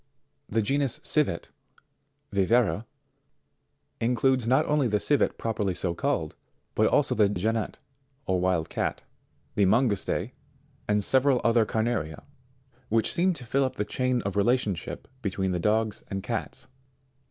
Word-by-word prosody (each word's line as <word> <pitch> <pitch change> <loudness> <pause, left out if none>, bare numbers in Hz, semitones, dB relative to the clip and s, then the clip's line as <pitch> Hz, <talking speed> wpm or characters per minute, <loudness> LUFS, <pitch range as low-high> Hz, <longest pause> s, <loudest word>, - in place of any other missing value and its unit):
62. - - -12
The 115 - +4
genus 135 +2 0
CIVET, 145 - 0 0.8
Viverra, 105 +2 +2 1.1
includes 125 +1 +2
not 130 +6 +4
only 145 -3 +2
the 105 -2 +1
Civet 145 +4 +1
properly 105 -5 -1
so 85 -1 -1
called, - - -1 0.4
but - - +3
also - - +3
the 105 -2 +3
Genet, 110 +3 -1 0.5
or 95 -1 +1
wild 90 -3 +1
cat, - - -2 0.5
the 100 -2 +3
Mangouste 110 -1 +1 0.6
and 105 -1 +2
several 130 +2 +3
other 115 -2 +3
carnaria, 110 -9 -1 0.7
which 115 0 +1
seem 185 +2 +2
to 135 -7 -8
fill 135 +4 +1
up 130 - -2
the 105 - -2
chain 125 +1 0
of 100 0 -3
re 100 - +3
lationship 115 -7 -1 0.2
between 95 -3 -1
the 90 - -1
dogs 110 +2 +1
and 95 -1 -4
cats. 115 +2 -4
110 Hz, 140 wpm, -27 LUFS, 100-125 Hz, 1.1 s, The